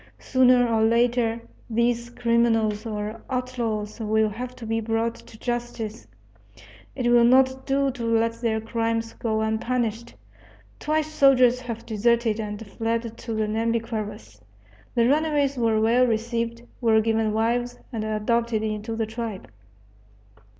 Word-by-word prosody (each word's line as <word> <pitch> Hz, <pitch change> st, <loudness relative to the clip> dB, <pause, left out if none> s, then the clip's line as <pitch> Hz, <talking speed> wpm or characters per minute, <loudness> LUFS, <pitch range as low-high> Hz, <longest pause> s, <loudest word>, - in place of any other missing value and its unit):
Sooner 250 Hz, -1 st, +4 dB
or 225 Hz, -1 st, +1 dB
later 235 Hz, 0 st, +2 dB, 0.3 s
these 235 Hz, +1 st, 0 dB
criminals 230 Hz, -3 st, +1 dB
or 215 Hz, +1 st, -4 dB
outlaws 240 Hz, -5 st, -3 dB
will 220 Hz, 0 st, +1 dB
have 245 Hz, +4 st, -6 dB
to 230 Hz, -, -9 dB
be 225 Hz, +1 st, -1 dB
brought 225 Hz, +1 st, 0 dB
to 220 Hz, -, -15 dB
justice; 240 Hz, -2 st, -4 dB, 0.9 s
it 240 Hz, -2 st, +1 dB
will 240 Hz, -1 st, +6 dB
not 260 Hz, +2 st, +4 dB
do 275 Hz, 0 st, +2 dB
to 245 Hz, -2 st, -7 dB
let 230 Hz, 0 st, +1 dB
their 220 Hz, -2 st, 0 dB
crimes 225 Hz, 0 st, -2 dB
go 220 Hz, -2 st, -1 dB
unpunished. 225 Hz, +1 st, -2 dB, 0.6 s
Twice 310 Hz, 0 st, 0 dB
soldiers 265 Hz, -5 st, +4 dB
have 235 Hz, -3 st, -6 dB
deserted 230 Hz, 0 st, +1 dB
and 210 Hz, 0 st, -5 dB
fled 230 Hz, +2 st, -3 dB
to 230 Hz, -, -6 dB
the 215 Hz, 0 st, 0 dB
Nhambiquaras. 220 Hz, -, -3 dB, 0.5 s
The 235 Hz, 0 st, +4 dB
runaways 290 Hz, -1 st, +2 dB
were 225 Hz, -3 st, +2 dB
well 235 Hz, +3 st, +4 dB
received, 230 Hz, +1 st, -2 dB, 0.2 s
were 225 Hz, -2 st, +4 dB
given 220 Hz, 0 st, +1 dB
wives, 235 Hz, +3 st, 0 dB, 0.2 s
and 220 Hz, -2 st, -2 dB
adopted 220 Hz, +1 st, 0 dB
into 215 Hz, +1 st, -3 dB
the 225 Hz, 0 st, -1 dB
tribe. 220 Hz, -, -6 dB
230 Hz, 135 wpm, -24 LUFS, 220-240 Hz, 0.9 s, will